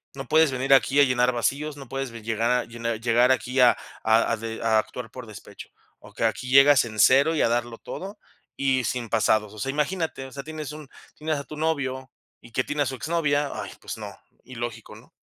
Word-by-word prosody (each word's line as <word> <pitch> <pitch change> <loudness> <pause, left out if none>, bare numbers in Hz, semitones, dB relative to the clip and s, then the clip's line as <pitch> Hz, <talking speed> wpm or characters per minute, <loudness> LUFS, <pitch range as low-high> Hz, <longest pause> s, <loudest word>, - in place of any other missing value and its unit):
no 135 -1 -7
puedes 160 -2 +4
venir 130 +1 +2
aquí 135 +1 +4
a - - +8
llenar 125 -1 +2
vacíos, 140 +6 -1
no 135 -3 -11
puedes 135 -2 -4
ve 115 -1 -9
llegar 115 +3 0
llenar 115 -1 -4
llegar 120 +2 +3
aquí 130 +1 -2
a 125 - +6 0.3
a 110 +1 +3
a - - -1
de 115 0 -6
a 110 -1 +3
actuar 110 +1 -6
por 125 -1 -9
despecho. 110 -3 -11 0.3
O - - -16
que - - -4
aquí 115 +3 -1
llegas 135 -1 +7
en 110 -2 -8
0 140 +8 +5
y - - +1
a - - +3
darlo 120 0 -1
todo, 195 +3 -8 0.4
y 130 -2 +1
sin 120 -3 -3
pasados. 110 -1 +1
O 110 - -11
sea, 135 - -3
imagínate, 150 -1 -2
o - - -14
sea, 140 - -6
tienes 155 -1 -6
un 150 -1 -10 0.3
tienes 155 0 -2
a 140 - -5
tu 155 - -9
novio 135 -5 -2 0.3
y 120 - -16
que 130 - +1
tiene 145 +2 -1
a - - -4
su 135 - -4
exnovia. 145 0 0
Ay, - - -6
pues - - -6
no, - - -8 0.3
ilógico, 120 -3 -7
¿no? - - -16
130 Hz, 225 wpm, -25 LUFS, 115-145 Hz, 0.4 s, a